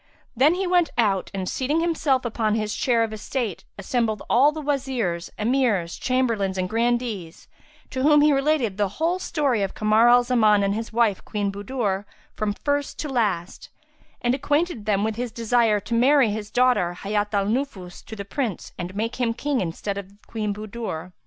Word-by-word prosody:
Then 285 +8 +4
he 385 +1 -1
went 355 -3 +3
out 200 -5 +1
and, 190 -2 -4
seating 280 - 0
himself 310 -6 +1
upon 220 -2 0
his 215 -1 -2
chair 235 -3 +2
of 220 -1 -3
estate, 215 -2 -4
assembled 220 +2 -1
all 275 +5 +5
the 310 - -6
Wazirs, 260 - -2
Emirs, 215 -7 +1
Chamberlains 230 -7 0
and 185 0 0
Grandees, 225 -5 -2 0.4
to 260 - -3
whom 295 +1 +5
he 300 0 +5
related 275 -7 +1
the 205 -1 +2
whole 340 +4 +1
story 280 - 0
of 195 - -2
Kamar 215 +2 +4
al 245 0 +6
Zaman 215 -5 +3
and 200 0 +1
his 225 +2 -4
wife, 225 -4 +1
Queen 205 -2 -2
Budur, 205 -1 -2 0.3
from 215 -1 -1
first 285 +2 -2
to 300 - -4
last; 205 -9 -2 0.5
and 240 0 +2
acquainted 290 - -1
them 200 -1 +2
with 220 0 -2
his 245 -1 -3
desire 230 -2 +2
to 230 - -6
marry 255 0 +4
his 210 0 -5
daughter 245 -7 +2
Hayat 205 +1 -1
al 200 -1 +2
Nufus 210 -6 -3
to 220 - -8
the 200 -2 -6
Prince 235 - -3
and 180 +2 -5
make 225 +3 -2
him 235 -2 0
King 285 +1 -1
in 175 - -1
the 165 - -10
stead 200 -1 -3
of 195 -1 -10
Queen 215 -2 -3
Budur. 210 -5 -6
230 Hz, 185 wpm, -24 LUFS, 205-260 Hz, 0.5 s, al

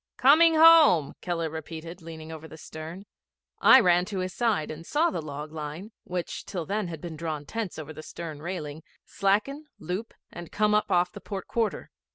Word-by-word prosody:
'Coming 320 +5 +6
home,' 315 - +7
Keller 170 -2 -2
repeated, 165 +2 -8
leaning 160 -1 -9
over 160 0 -8
the 160 - -12
stern. 160 +5 -9 0.5
I 260 - +8
ran 180 -5 +4
to 200 0 -5
his 185 0 -3
side 215 -8 0
and 155 +1 -8
saw 315 - +1
the - - -3
log 150 0 -7
line, 160 +6 -7
which 180 -1 -4
till 175 -5 -4
then 205 +1 -2
had 165 -3 -7
been 170 -2 -6
drawn 155 -2 -4
tense 225 +1 -4
over 155 0 -7
the 155 - -9
stern 155 -2 -8
railing, 155 -3 -5 0.2
slacken, 215 +10 0
loop, 185 +8 -5 0.2
and 175 -2 -9
come 210 0 +2
up 210 - +2
off 180 0 +2
the - - -10
port 195 -3 -6
quarter. 230 -2 -2
175 Hz, 190 wpm, -27 LUFS, 160-210 Hz, 0.5 s, I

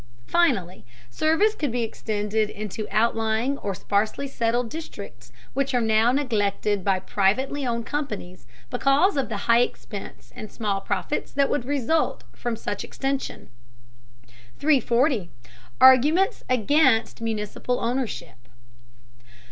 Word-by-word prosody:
Finally, 190 - +1 0.3
service 320 - +2
could 295 - -2
be 240 0 -1
extended 215 -1 -1
into 215 0 -5
outlying 225 +4 +1
or 200 -2 -3
sparsely 215 +9 -1
settled 240 -2 0
districts 200 - -9 0.2
which 275 0 0
are - - +4
now 220 +1 +3
neglected 210 -6 0
by 195 -1 +2
privately 250 +9 0
owned 235 -1 -2
companies 210 - -5 0.2
because 285 +8 +3
of 275 -4 -1
the 205 -3 -4
high 235 0 +5
expense 220 -4 -4
and 215 - -8
small 205 -4 -2
profits 200 +9 -2
that 280 -1 +1
would 250 - -1
result 285 - 0
from 240 -1 -3
such 205 -2 -4
extension. 270 0 -4 1.1
340. 255 - +2 0.5
ARGUMENTS 295 - +5
AGAINST 255 -1 +3
MUNICIPAL 225 +2 -2
OWNDERSHIP. 230 - -4
230 Hz, 115 wpm, -24 LUFS, 210-275 Hz, 1.1 s, high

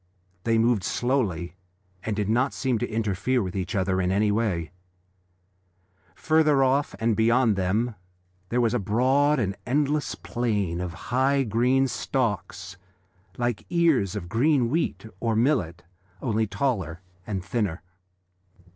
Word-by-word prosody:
They 115 0 +3
moved 115 -3 +2
slowly 105 -10 -1 0.5
and 110 0 -3
did 105 -1 -1
not 125 +5 +1
seem 130 -4 0
to 120 - -2
interfere 110 +2 0
with 90 0 -5
each 95 0 -3
other 95 -1 +1
in 90 0 0
any 105 +2 +2
way. 100 -7 -1 1.4
Further 155 -2 +3
off, 135 +3 +1
and 115 0 +1
beyond 115 0 +3
them, 105 +6 0 0.6
there 120 - 0
was 115 -1 +2
a 125 - +1
broad 130 +8 +2
and 100 -6 -1
endless 145 +3 0
plain 105 -8 -2
of 90 -1 -3 0.2
high 135 +2 +3
green 125 +4 +2
stalks 100 - -3 0.6
like 120 -2 -2
ears 160 - +2
of 95 -4 -5
green 125 - +2
wheat 165 -6 -1
or 115 0 0
millet, 110 - +1 0.4
only 110 -3 0
taller 95 - -2 0.3
and 95 -4 -3
thinner. 100 -6 -2
115 Hz, 135 wpm, -25 LUFS, 100-130 Hz, 1.4 s, They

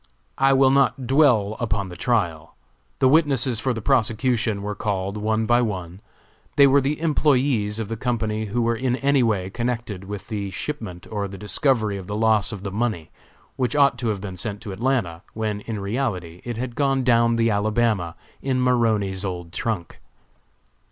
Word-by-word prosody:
I 135 0 +5
will 135 0 +5
not 135 -1 +2
dwell 120 -6 +3
upon 105 -5 -1
the 90 - -9
trial. 85 -8 -1 0.4
The 130 - +4
witnesses 135 -5 +3
for 130 +2 0
the 115 -3 -4
prosecution 115 -4 +1
were 105 +1 -3
called 100 -1 -2
one 110 +1 0
by 120 +2 +3
one. 95 -5 -4 0.5
They 140 - +7
were 140 +1 +5
the 140 +3 0
employés 140 -9 +1
of 110 -2 -3
the 115 - -3
company 110 -2 -2
who 115 +3 -1
were 115 0 +1
in 125 +1 0
any 140 +1 +2
way 100 -5 0
connected 115 -4 -3
with 100 0 -7
the 100 -3 -3
shipment 95 -4 -5
or 100 -2 -2
the 95 0 -9
discovery 110 0 +1
of 95 -2 -8
the 105 - -4
loss 110 -1 +2
of 100 -3 -7
the 100 - -4
money, 105 -6 -2 0.5
which 130 +2 0
ought 140 -4 +4
to 120 - -2
have 105 -3 -1
been 95 -3 -6
sent 100 +2 -4
to 110 -4 -7
Atlanta, 100 -6 -1
when, 105 -2 -2
in 110 0 -5
reality, 100 -6 -3
it 120 -2 -4
had 125 0 -4
gone 135 -1 +1
down 115 -1 +3
the 115 0 +2
Alabama 105 -3 0 0.3
in 130 -2 0
Maroney's 110 -6 +1
old 90 -3 -5
trunk. 105 -7 -3
110 Hz, 180 wpm, -23 LUFS, 100-125 Hz, 0.5 s, They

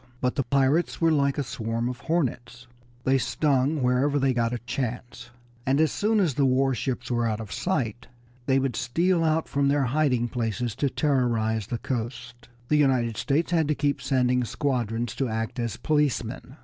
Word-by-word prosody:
But 125 0 0
the - - 0
pirates 140 +6 +1
were 165 -1 +3
like 140 -2 +2
a 145 - 0
swarm 115 0 -3
of 125 -1 -4
hornets; 125 -6 -2 0.4
they 135 +1 +3
stung 140 +1 +1
wherever 130 +3 +2
they 135 -2 +2
got 115 -1 0
a 125 - -1
chance, 120 0 -5 0.3
and 135 +3 +1
as 155 -2 +3
soon 215 +1 +1
as 175 -8 +2
the 140 +2 +1
war 135 +1 +2
ships 125 0 -3
were 120 -1 +1
out 110 -1 -2
of 110 -3 -7
sight 125 - -2 0.4
they 135 -1 +3
would 135 -3 0
steal 170 +9 +1
out 160 0 +1
from 140 0 +1
their 140 0 +2
hiding 130 -2 +1
places 120 -1 -2
to 140 - +1
terrorize 115 -7 0
the 120 - -2
coast. 120 0 -5 0.2
The 150 - +4
United 130 -6 +2
States 150 +9 0
had 165 -3 +2
to 150 - +1
keep 145 0 0
sending 125 -2 +1
squadrons 120 -2 -2
to 135 -3 0
act 115 +2 -3
as 115 -4 -2
policemen. 140 -3 -1
130 Hz, 185 wpm, -26 LUFS, 120-145 Hz, 0.4 s, The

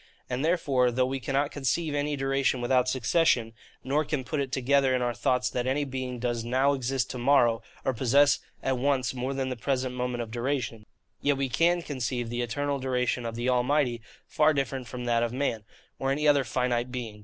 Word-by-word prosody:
And 125 +3 -1
therefore, 140 -7 +2
though 125 +1 +1
we 135 +1 -2
cannot 140 +3 0
conceive 150 +3 -1
any 145 0 0
duration 135 -1 +1
without 125 +1 +2
succession, 125 -2 +2 0.3
nor 145 +4 +1
can 145 -2 -2
put 150 +3 -3
it 135 -2 -2
together 135 0 +2
in 125 - 0
our 120 0 0
thoughts 125 +1 +1
that 125 0 -2
any 140 +3 +1
being 130 -2 -4
does 120 -1 -2
NOW 130 +4 +2
exist 130 -3 -1
to 125 - -5
morrow, 120 -3 +3 0.2
or 130 - +1
possess 135 +4 +4 0.2
at 130 -2 0
once 135 -2 +1
more 130 +2 -3
than 135 -1 -1
the 130 - -3
present 130 +1 -1
moment 125 -1 -2
of 110 - -10
duration; 120 -3 -3 0.3
yet 145 -1 +2
we 135 -1 -1
can 170 +7 +2
conceive 125 -4 -3
the 120 0 -2
eternal 140 +4 -2
duration 125 -2 -1
of 115 - -5
the 120 +2 -2
Almighty 125 -1 +1 0.2
far 155 0 +2
different 135 -2 -2
from 125 -1 -6
that 120 -1 +2
of 120 -1 0
man, 125 -5 -2 0.3
or 135 - -1
any 150 +2 +1
other 145 -2 +5
finite 125 -1 -1
being. 115 -4 -6
130 Hz, 200 wpm, -27 LUFS, 120-140 Hz, 0.3 s, other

